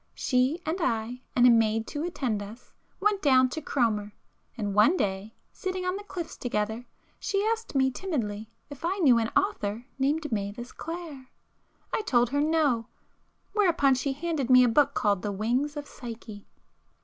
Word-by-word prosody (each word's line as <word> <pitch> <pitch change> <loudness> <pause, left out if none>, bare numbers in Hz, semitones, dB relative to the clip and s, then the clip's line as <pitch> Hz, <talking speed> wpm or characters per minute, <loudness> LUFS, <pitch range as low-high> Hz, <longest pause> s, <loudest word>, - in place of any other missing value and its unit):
She 255 +5 +1
and 335 +4 -2
I, 235 -1 -1
and 245 - +5
a 250 - +8
maid 225 -1 +3
to 295 - -4
attend 255 -11 -2
us, 215 +5 -11 0.3
went 405 0 +1
down 260 -3 +5
to 315 - -5
Cromer,—and 210 -3 -3
one 215 - +5
day, 195 - -2 0.2
sitting 370 -1 -4
on 365 +1 0
the 405 - -6
cliffs 350 -5 -6
together, 220 0 -2 0.3
she 400 +1 0
asked 450 -6 -2
me 265 -1 +3
timidly 225 - -3 0.2
if 285 - -10
I 365 +4 0
knew 265 -11 +5
an 225 - 0
author 235 - -1
named 300 +2 0
Mavis 210 +3 -3
Clare? 325 -6 -7 0.7
I - - +1
told 245 - +2
her 285 +1 +1
no,—whereupon 310 - 0
she 270 +2 -1
handed 295 -3 -2
me 255 0 +8
a - - +4
book 280 +5 +3
called 200 -3 +1
'The 205 -1 -3
Wings 250 +9 -1
of 290 - -4
Psyche. 225 -6 -9
255 Hz, 160 wpm, -27 LUFS, 225-320 Hz, 0.7 s, a